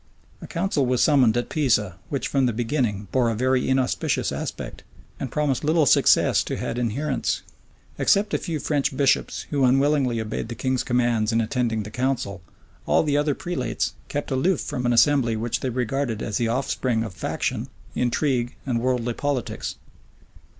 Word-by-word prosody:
A - - -8
council 170 -4 0
was 125 -1 +2
summoned 130 -7 +4
at 120 - -2
Pisa, 105 - +1
which 140 - -2
from 135 -2 +2
the 120 - 0
beginning 115 -4 -1
bore 125 -3 +2
a 115 - -1
very 130 +3 +1
inauspicious 130 -1 +1
aspect, - - -5 0.4
and 130 - -4
promised 150 -3 0
little 155 +1 +3
success - - +4
to - - -3
had 120 - -3
adherents. 130 +5 -1 0.6
Except 205 +2 +3
a - - +2
few 165 -4 -3
French 140 -2 -1
bishops, 135 -1 +1
who 140 -2 +1
unwillingly 135 -1 +3
obeyed 110 0 -3
the 115 - -6
king's 130 +2 0
commands 120 -3 +1
in 115 - +2
attending 115 -1 0
the 105 - -9
council, 125 -6 -2 0.5
all - - +4
the 145 -2 0
other 145 -1 +1
prelates 175 0 -2
kept 145 0 -4
aloof 150 +6 +1
from 125 -1 -2
an 120 - +3
assembly 120 -1 +4
which 115 +2 -1
they 130 - -2
regarded 125 -1 -2
as 110 -3 -2
the 120 - 0
offspring 125 -1 0
of 110 -4 -6
faction, 85 - -2 0.3
intrigue, 125 -1 0
and 125 -4 0
worldly 125 -1 0
politics. 140 -1 -3
125 Hz, 170 wpm, -24 LUFS, 115-140 Hz, 0.6 s, summoned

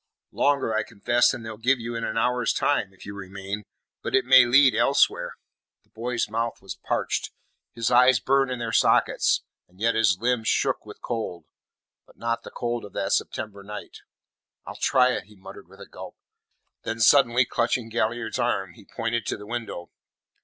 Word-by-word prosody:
"Longer, 140 -5 +1
I 110 - +1
confess, 115 +3 +1
than 120 -3 -3
they'll 110 -1 -7
give 125 +3 +2
you 120 +1 -5
in 115 0 -4
an 110 - -3
hour's 125 +1 +1
time, 110 -9 0
if 95 - -16
you 100 - -7
remain; 100 +1 -6 0.4
but - - -1
it 130 -1 +3
may 130 -1 +8
lead 135 +1 +6
elsewhere." 105 -7 +2 0.5
The - - -38
boy's 120 +1 -2
mouth 115 +2 -3
was 95 - -7
parched. - - -2 0.5
His 115 0 -1
eyes 125 0 +6
burned 135 0 +2
in 125 - -3
their 115 -1 -4
sockets, - - +3 0.2
and 90 +1 -25
yet 115 +2 +2
his 105 -4 +3
limbs 120 -1 0
shook - - 0
with - - -12
cold 110 -7 -4 0.6
but - - -22
not 115 0 -2
the - - -10
cold 120 -1 -3
of 100 - -11
that - - -2
September 100 -2 -3
night. 105 +1 -9 0.7
"I'll - - -8
try 130 -1 +3
it," 125 - -3
he 105 +1 -19
muttered 95 -2 -12
with 95 +2 -18
a 100 - -10
gulp. 95 -1 -11 0.7
Then 115 0 -4
suddenly 125 +1 +5
clutching 120 0 -1
Galliard's 115 0 -2
arm, 100 -7 -1
he - - -17
pointed 115 0 -3
to - - -2
the 105 - -11
window. 115 -6 -6
115 Hz, 185 wpm, -25 LUFS, 105-125 Hz, 0.7 s, may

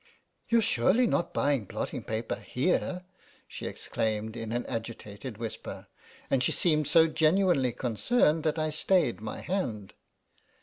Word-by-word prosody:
"YouVe 230 -1 +4
surely 195 - +3
not 175 - 0
buying 140 -6 +1
blotting - - -4
paper 110 +1 -3
here}'' 180 +6 -1 0.5
she - - -6
exclaimed 110 0 -2
in 115 -1 -5
an 120 +1 -2
agitated 115 0 -6
whisper, 115 -1 -6 0.4
and 135 - +1
she 125 - +3
seemed 155 -4 +2
so 160 +2 +6
genuinely 160 -4 +3
concerned 150 - +1
that 155 0 0
I 155 0 0
stayed 155 - +1
my 110 - -5
hand. 115 - -3
135 Hz, 135 wpm, -29 LUFS, 115-170 Hz, 0.5 s, so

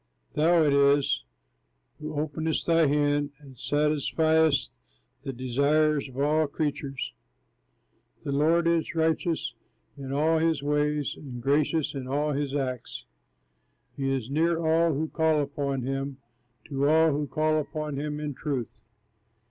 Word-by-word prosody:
Thou 165 +2 +4
it 145 -2 +3
is 140 - +3 0.7
who 155 -1 -4
openest 155 +1 -2
thy 165 -2 +4
hand, 145 0 +1
And 140 -3 -15
satisfiest 150 +2 +2 0.5
the 135 - -4
desires 140 +4 +1
of 130 - -13
all 150 +2 +2
creatures. 140 -2 -3 1.1
The 140 - -3
Lord 160 +4 +3
is 170 0 0
righteous 160 +1 0 0.4
in 135 -2 -7
all 155 +3 +2
his 160 -3 +1
ways, 150 0 0
And 130 -4 -8
gracious 145 +4 +1
in 135 -3 -5
all 145 +3 0
his 140 -1 -2
acts. 130 -4 -4 0.9
He 135 -1 -2
is 135 -2 -2
near 165 +3 +2
all 165 +1 +3
who 155 +3 -1
call 160 -1 +1
upon 140 -2 -2
him, 135 +1 -3 0.5
To 140 0 +1
all 160 +1 +5
who 145 0 -1
call 155 +1 +1
upon 150 -1 -4
him 150 0 -3
in 150 -1 -4
truth. 135 -4 -3
150 Hz, 135 wpm, -27 LUFS, 140-155 Hz, 1.1 s, all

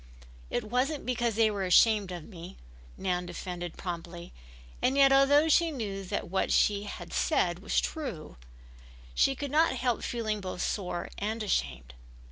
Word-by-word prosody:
"It 240 - -1
wasn't 255 +7 -1
because 240 -3 0
they 220 -1 +3
were 200 -2 -3
ashamed 200 +1 +4
of 175 -3 -6
me," 175 -2 -11 0.4
Nan 180 -2 -2
defended 175 -1 -6
promptly, 175 -1 -7 0.5
and 265 +2 +2
yet 275 -1 +6
although 285 +3 +5
she 335 +2 +4
knew 205 -9 -4
that - - -3
what 190 +2 -1
she 205 0 +2
had - - -8
said - - +1
was - - 0
true 250 - -5 0.8
she 270 - +3
could 285 0 -5
not 315 -1 +3
help 245 -2 0
feeling 220 -3 -2
both 185 -1 -4
sore 180 -4 -3
and 215 +2 -2
ashamed. 65 - -2
210 Hz, 155 wpm, -29 LUFS, 180-255 Hz, 0.8 s, yet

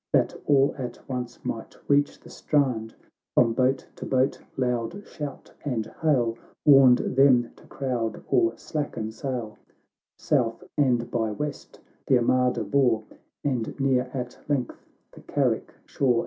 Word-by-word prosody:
That - - +3
all 140 -1 +4
at 125 -2 -4
once 125 -2 -4
might 115 - -5
reach 145 0 +2
the - - -15
straud, 125 -7 0 0.4
Prom 115 -2 +4
boat 130 +2 +1
to - - -7
boat 130 +1 +1 0.2
loud 125 - -1
shout 145 -3 -7
and 120 -7 -1 0.2
hail 120 -7 +2 0.3
"Warned 135 -4 +8 0.2
them 130 -3 +5
to - - -18
crowd 120 -5 -3
or 115 0 +2
slacken 120 -8 -4
sail 115 -2 -5 0.6
South 115 -2 0
and 125 -5 +2
by 115 -2 0
west 145 +7 -5 0.3
the 130 - +5
armada 125 -1 +2
bore, 115 0 +2 0.4
And 130 -2 -2
near 130 -2 +2
at 125 -2 -5
length 135 -5 -2 0.2
the - - -14
Carrick - - 0
shore. 125 -4 +1
125 Hz, 135 wpm, -26 LUFS, 115-135 Hz, 0.6 s, Warned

